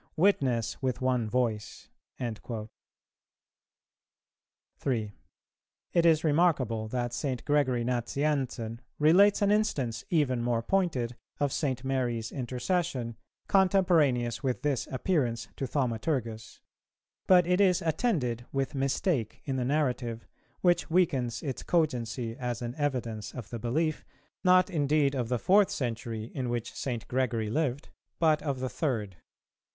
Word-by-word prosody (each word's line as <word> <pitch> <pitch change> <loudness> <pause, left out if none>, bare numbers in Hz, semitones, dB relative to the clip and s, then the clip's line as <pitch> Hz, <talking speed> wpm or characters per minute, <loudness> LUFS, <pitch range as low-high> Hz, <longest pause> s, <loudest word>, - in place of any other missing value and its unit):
witness 135 - +1
with 130 -2 -1
one 125 -4 +1
voice."[418:2] 115 -1 -4 2.1
3. 110 -6 -1 0.8
It 170 -1 +3
is 160 -1 +4
remarkable 145 -9 +2
that 120 +1 -2
St. 130 -1 -3
Gregory 135 -5 +2
Nazianzen 125 -2 -1 0.2
relates 195 +7 +5
an 200 - +3
instance, 135 - 0
even 140 -7 +2
more 120 -1 0
pointed, 130 -9 0 0.2
of 145 -2 +1
St. 130 -4 -1
Mary's 120 -4 -1
intercession, 125 0 -2 0.3
contemporaneous 170 - +3
with 130 -3 -2
this 140 -5 0
appearance 125 -5 -1
to 135 - -3
Thaumaturgus; 115 -3 -2 0.7
but 180 -2 +6
it 180 +3 +2
is 185 -2 +3
attended 150 - 0
with 135 -1 -1
mistake 135 - -1
in 135 -2 -1
the 125 - 0
narrative, 125 -4 -1 0.4
which 175 -1 +2
weakens 135 -9 +1
its 135 -5 -3
cogency 120 -8 -1
as 125 -1 -3
an 120 0 -3
evidence 120 -7 -2
of 120 -5 -8
the 120 - -4
belief, 155 +8 -1 0.4
not 185 0 +5
indeed 150 -5 +2
of 125 -4 -2
the 125 - +1
fourth 195 - +4
century, 115 -3 -4
in 130 -3 -2
which 120 -1 -3
St. 120 -4 -4
Gregory 120 -4 0
lived, 145 0 -1 0.3
but 155 -2 +3
of 140 -4 -2
the 130 - -1
third. 110 - -2
130 Hz, 125 wpm, -29 LUFS, 120-155 Hz, 2.1 s, but